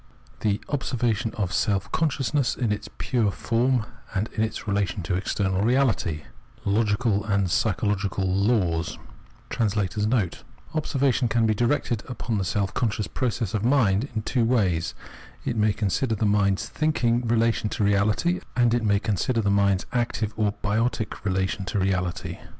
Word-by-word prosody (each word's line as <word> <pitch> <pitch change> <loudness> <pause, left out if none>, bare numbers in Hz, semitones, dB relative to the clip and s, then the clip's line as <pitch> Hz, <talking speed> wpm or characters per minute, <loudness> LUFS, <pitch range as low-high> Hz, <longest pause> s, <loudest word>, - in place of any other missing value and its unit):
h 105 -1 +1
Observation 120 -4 0
of 100 -4 -1
Selp 100 -2 0
Consciousness 145 -3 +1
in 120 -4 -1
its 105 - -3
pure 115 -5 +1
FORM 120 +3 +1 0.3
AND 100 +4 0
IN 110 - -3
ITS 110 0 -3
RELATION 100 -1 0
TO 85 - -2
EXTERNAL 95 +1 0
EeALITY 115 - +1 0.2
— 60 - -28
Logical 105 0 +1
and 100 -4 +1
Psychological 100 -3 0
Laws 95 -4 +1 1.8
[Observation 140 -4 +1
can 115 0 +2
be 110 - +3
directed 120 0 0
upon 115 -3 -2
the - - 0
self 100 +2 -1
conscious 105 -3 0
process 120 -5 -2
ot 105 -1 -1
mind 120 -2 +3
in 110 - -1
two 125 +1 +1
waj'S: 100 -9 +1 0.5
it - - -1
may 105 -1 +3
consider 105 +4 0
tbe 110 - 0
mind's 100 -2 +2
thinking 120 -6 +1
relation 115 -1 +2
to 105 - -2
reality, 105 - +2 0.2
and 120 -2 +3
it 120 - +2
may 100 -2 +3
consider 110 +3 0
the 100 -2 +1
mind's 100 -1 +2
active 120 -3 -1
or 105 -2 +1
biotic 110 +2 -1
relation 95 0 -1
to 100 - -2
reality. 90 -2 -1
110 Hz, 150 wpm, -25 LUFS, 100-120 Hz, 1.8 s, be